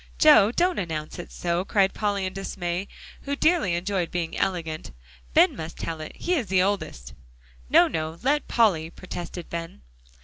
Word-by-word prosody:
"Joe, 265 -9 +7
don't 355 +6 +1
announce 160 -2 -4
it 175 - -8
so," 175 +1 -1
cried 195 -1 +2
Polly 205 -2 -1
in 185 - -4
dismay, 190 -1 -3 0.3
who 280 0 -3
dearly 310 - +2
enjoyed 180 0 -1
being 170 -2 -3
elegant. 165 -4 -2 0.5
"Ben - - +6
must 160 +1 -7
tell 165 -1 -4
it; 155 - -8
he 360 - -1
is 265 - 0
the 185 0 +3
oldest." 125 - -3 0.6
"No, - - +6
no; 160 0 -3
let 290 +3 +1
Polly," 185 -9 +2
protested 175 -1 -7
Ben. 165 - -6
185 Hz, 165 wpm, -25 LUFS, 165-205 Hz, 0.6 s, Joe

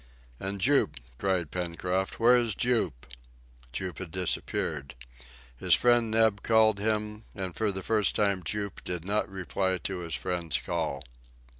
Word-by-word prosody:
"And 100 +1 -4
Jup!" 140 +8 +3 0.2
cried 90 -5 0
Pencroft; 90 +2 -2
"where 120 +2 +6
is 120 -4 +1
Jup?" 120 - 0 0.7
Jup 90 +8 -4
had 95 -3 -6
disappeared. 80 -5 -2 0.6
His - - +4
friend 120 -2 +3
Neb 110 -2 +3
called 110 -2 +4
him, 105 0 -1
and 95 -4 -4
for 110 -2 +1
the 95 -1 -4
first 105 -4 +2
time 100 -3 +2
Jup 100 +4 -3
did 90 -2 -4
not 105 +2 0
reply 95 0 -1
to 95 +1 -4
his 85 -2 -3
friend's 85 -4 -1
call. 70 - -2
95 Hz, 145 wpm, -29 LUFS, 90-110 Hz, 0.7 s, where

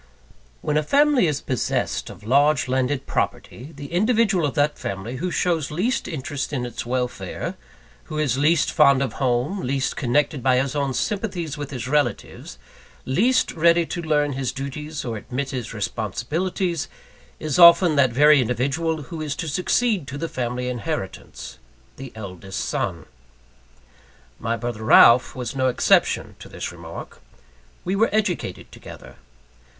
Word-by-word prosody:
When 150 - 0
a - - +3
family 280 - +3
is 145 -2 -1
possessed 130 -4 -2
of 100 - -12
large 140 +3 +3
landed 130 +1 0
property, 130 +6 -3
the 140 +1 -9
individual 205 -4 +2
of 135 - -5
that 145 +1 +1
family 100 +6 -5
who 180 +7 -2
shows 170 -4 0
least 195 +11 -1
interest 140 -1 -4
in 130 -4 -2
its 120 0 -6
welfare; 125 0 -3 0.5
who 155 - -6
is 145 -5 +1
least 150 +4 +2
fond 140 -3 +5
of 125 -5 -3
home, 130 +9 0
least 135 -3 -1
connected 145 +2 0
by 130 0 +3
his 135 +2 -1
own 140 -3 -1
sympathies 185 - -2
with 145 -2 -6
his 125 -3 -5
relatives, 135 -5 -2 0.5
least 225 - +2
ready 170 +1 +3
to 175 - -4
learn 150 -3 +1
his 130 -2 -2
duties 150 +3 -6
or 115 -3 -3
admit 130 +6 -4
his 125 -5 -5
responsibilities, 150 - -2 0.5
is 155 +1 -2
often 170 -1 +8
that 140 -2 +4
very 145 +3 +6
individual 140 +7 -1
who 160 +4 -7
is 150 -2 -3
to 165 - -5
succeed 180 - 0
to 140 - -6
the 165 - -3
family 125 -2 -3
inheritance 125 -3 -5 0.4
the 135 -1 -8
eldest 95 -2 -7
son. - - -3 1.3
My 115 +1 -2
brother 115 -1 -5
Ralph 120 +2 +6
was 125 +1 -5
no 130 -1 +1
exception 125 - +2
to - - -11
this - - -5
remark. - - -10 0.6
We 185 - 0
were 220 +3 +3
educated 205 - -2
together. - - -12
140 Hz, 150 wpm, -23 LUFS, 125-165 Hz, 1.3 s, often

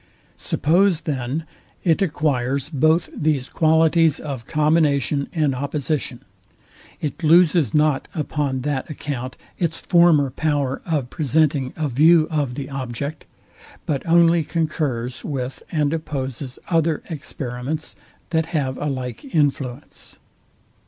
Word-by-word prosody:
Suppose, 175 +2 +2
then, 145 0 -3 0.4
it 165 0 +2
acquires 140 -5 0
both 160 +2 +2
these 145 -4 0
qualities 160 0 +3
of 135 -6 -6
combination 150 -2 +2
and 155 -5 +1
opposition, 140 -1 -3 0.8
it 150 +2 -4
loses 165 - +4
not 150 -2 +2
upon 145 -4 -1
that 140 -1 -2
account 130 -4 -5 0.2
its 165 -2 0
former 170 -6 +4
power 140 -2 -1
of 145 -7 -1
presenting 145 -2 +1
a 155 -1 -1
view 155 +5 +5
of 145 -5 -1
the 135 -1 -5
object, 135 +2 -5 0.6
but 140 -3 -1
only 170 0 +5
concurs 145 -7 -2
with 130 -3 -4
and 150 -2 +1
opposes 135 -4 -4
other 165 -2 +1
experiments, 140 -1 -4 0.4
that 160 -1 +1
have 140 -6 -2
a - - -3
like 130 -4 -4
influence. 140 -3 -2
150 Hz, 115 wpm, -22 LUFS, 135-160 Hz, 0.8 s, view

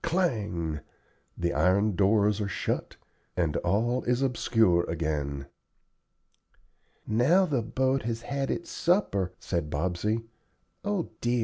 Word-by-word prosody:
Clang! 105 - 0 0.6
the 85 -1 0
iron 100 +3 +3
doors 105 +1 +3
are 100 - -1
shut, 95 - -2 0.4
and 85 -4 +1
all 115 +7 +1
is 125 +2 +1
obscure 115 -8 +3
again. 75 -4 -2 1.6
"Now 145 - +4
the 140 -8 0
boat 130 +3 0
has 115 0 -3
had 135 +1 -2
its 170 - -3
supper," 130 - +1
said 85 -4 -2
Bobsey. 90 +9 -1 0.6
"O 205 -4 -1
dear! 120 +1 +1
110 Hz, 115 wpm, -28 LUFS, 85-130 Hz, 1.6 s, Now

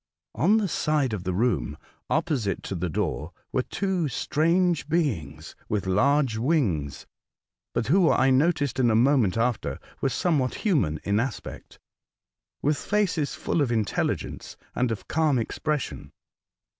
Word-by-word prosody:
On 195 - +3
the 210 -3 +1
side 150 -7 0
of 95 -3 -4
the 95 - 0
room 90 - 0 0.3
opposite 150 - 0
to - - -5
the 90 -1 -2
door 80 +2 -2 0.2
were 130 - +1
two 185 +2 -1
strange 165 +5 +1
beings 140 - -2
with 105 -2 -1
large 125 +5 +2
wings, 110 - 0 0.7
but - - -1
who, 175 +4 +4
I 130 0 +3
noticed 145 -1 +2
in 120 -2 +4
a 110 - +3
moment 120 -4 +3
after, 115 - 0 0.2
were 135 - +2
somewhat 140 -3 0
human 130 - +2
in 100 +1 +1
aspect, 125 -1 -5 0.9
with 150 +1 +2
faces 200 -8 0
full 160 - -1
of 130 -4 +1
intelligence 110 -4 -2 0.2
and 125 -2 0
of 110 - -5
calm 155 -4 +2
ex 115 - -3
pression. 150 -3 -2
130 Hz, 145 wpm, -26 LUFS, 105-155 Hz, 0.9 s, who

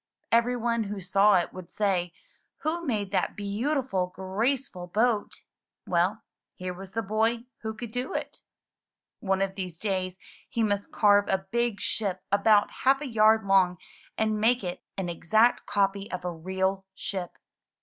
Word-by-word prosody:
Every 235 +2 +3
one 235 -1 0
who 205 0 -4
saw 195 +3 +4
it 175 -2 +1
would 185 -2 -9
say, 185 -4 0 0.5
'*Who 330 +3 -1
made 210 - -1
that 200 - 0
beautiful, 210 -1 -1
graceful 190 +2 -2
boat?" 220 +3 +1 0.5
Well, 185 +5 +1 0.3
here 185 0 -5
was 190 +1 -10
the 225 - -1
boy 225 +3 +1 0.2
who 220 -1 -4
could 235 0 -7
do 250 +2 -3
it! - - -5 0.8
One 195 -1 +1
of 195 0 -2
these 185 -4 -5
days 185 -2 -2 0.3
he 230 -3 0
must 205 -2 -1
carve 205 -1 +4
a 190 0 0
big 235 -3 0
ship 200 -4 -2
about 205 +1 +4
half 270 +1 +5
a 295 - -3
yard 220 -2 +4
long 190 -2 +4 0.4
and 215 -1 +1
make 235 +1 +3
it 180 -1 -4 0.2
an 190 -2 -2
exact 215 +8 +2
copy 200 0 0
of 180 -1 -4
a 180 - -1
real 190 +3 -1
ship. 185 -3 -4
205 Hz, 160 wpm, -27 LUFS, 190-225 Hz, 0.8 s, half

